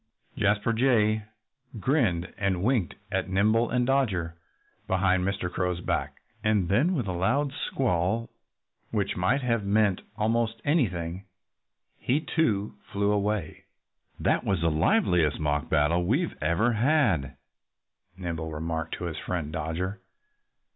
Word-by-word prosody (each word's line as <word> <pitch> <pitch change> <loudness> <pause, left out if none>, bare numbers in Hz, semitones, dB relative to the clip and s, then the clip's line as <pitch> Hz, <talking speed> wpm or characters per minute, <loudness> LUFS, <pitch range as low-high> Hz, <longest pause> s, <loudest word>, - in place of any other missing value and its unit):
Jasper 105 +3 +1
Jay 110 -3 +2 0.5
grinned 100 - +1
and 95 -2 -1
winked 115 -6 +1 0.2
at - - -1
Nimble 110 +5 +2
and 125 -1 +1
Dodger 100 -12 0 0.5
behind 95 -1 +2
Mr. 95 -1 -1
Crow's 90 0 -2
back. 85 - -2 0.3
And 105 -5 +2
then 145 - +3
with 125 -8 -1
a 95 - -2
loud 135 +11 0
squall 115 -4 -1 0.6
which 100 -3 -1
might 125 +10 +1
have 115 -3 +1
meant 100 -1 +2 0.2
almost 115 +1 0
anything 95 - 0 0.7
he 135 +4 +1
too 115 - 0 0.2
flew 100 0 +1
away. 105 -5 -1 0.5
"That - - +1
was 95 -4 0
the 85 -1 +2
liveliest 85 - +2
mock 75 -1 -1
battle 80 +3 +2
we 135 - +1
ever 85 +10 +2
had," 105 - +2 0.8
Nimble 85 -3 -4
remarked 80 +1 -3
to - - -8
his 80 -3 -4
friend 85 -4 -3
Dodger. 90 +4 -3
100 Hz, 125 wpm, -27 LUFS, 85-115 Hz, 0.8 s, then